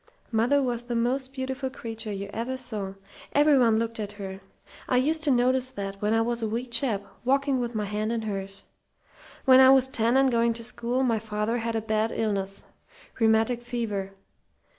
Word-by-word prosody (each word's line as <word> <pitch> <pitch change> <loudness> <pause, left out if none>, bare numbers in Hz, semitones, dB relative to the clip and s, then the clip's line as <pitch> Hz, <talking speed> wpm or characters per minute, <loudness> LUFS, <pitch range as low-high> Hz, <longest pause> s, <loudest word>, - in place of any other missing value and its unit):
"Mother 245 +5 +3
was 240 -2 -2
the 240 -1 -3
most 260 +3 0
beautiful 265 0 -3
creature 225 -3 -6
you 200 0 -4
ever 245 +4 -3
saw. 210 -6 -5 0.4
Everyone 275 -6 +5
looked 230 0 -2
at 205 -1 -4
her. 195 -1 -7 0.5
I 250 - +3
used 310 +5 +2
to - - +2
notice 255 0 +3
that 195 -4 -6
when 210 +1 +1
I 225 0 +3
was 235 0 -2
a 220 - 0
wee 230 +3 -2
chap, 235 -4 0 0.2
walking 275 +1 +2
with 240 -1 -3
my 210 -1 -1
hand 210 +2 -2
in 230 -1 -2
hers. 195 -2 -5 0.8
When 260 -1 +8
I 260 0 +8
was 265 -1 +5
ten 235 0 +2
and 270 -1 +4
going 235 0 +2
to 230 0 -4
school 245 +2 -1
my 230 -4 +1
father 215 +2 -2
had 230 0 -2
a 225 - 0
bad 220 0 0
illness 195 -3 -2 0.6
rheumatic 225 +1 +3
fever. 220 -5 -3
230 Hz, 185 wpm, -26 LUFS, 215-255 Hz, 0.8 s, When